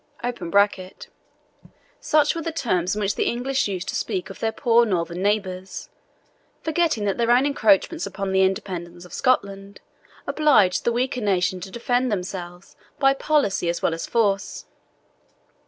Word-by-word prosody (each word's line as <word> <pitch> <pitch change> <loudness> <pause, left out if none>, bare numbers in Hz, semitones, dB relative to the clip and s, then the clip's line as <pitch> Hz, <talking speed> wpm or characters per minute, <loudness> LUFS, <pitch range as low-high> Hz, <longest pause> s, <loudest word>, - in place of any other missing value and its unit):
[Such 300 -1 +2
were 335 - -4
the 330 - -3
terms 185 - -1
in - - -3
which 200 0 0
the - - -1
English 260 +2 0
used 190 -2 -4
to - - -3
speak 190 +1 -3
of - - -12
their 225 - 0
poor 235 -1 +3
northern 175 -4 -2
neighbours, 190 -2 -2 0.7
forgetting 320 -9 0
that 200 +3 -1
their 235 0 +1
own 245 +3 +5
encroachments 280 - +2
upon 195 -1 -4
the 190 0 +3
independence 180 -2 -2
of 180 - -14
Scotland 200 -6 -1 0.5
obliged 280 -12 +3
the 235 - +3
weaker 250 +2 -1
nation 185 -2 +1
to 185 +2 -8
defend 245 +3 0
themselves 180 -2 -6 0.2
by 270 -1 +4
policy 275 - +1
as 170 - -3
well - - +2
as 165 - -5
force. 205 -4 0
205 Hz, 150 wpm, -23 LUFS, 185-250 Hz, 0.7 s, own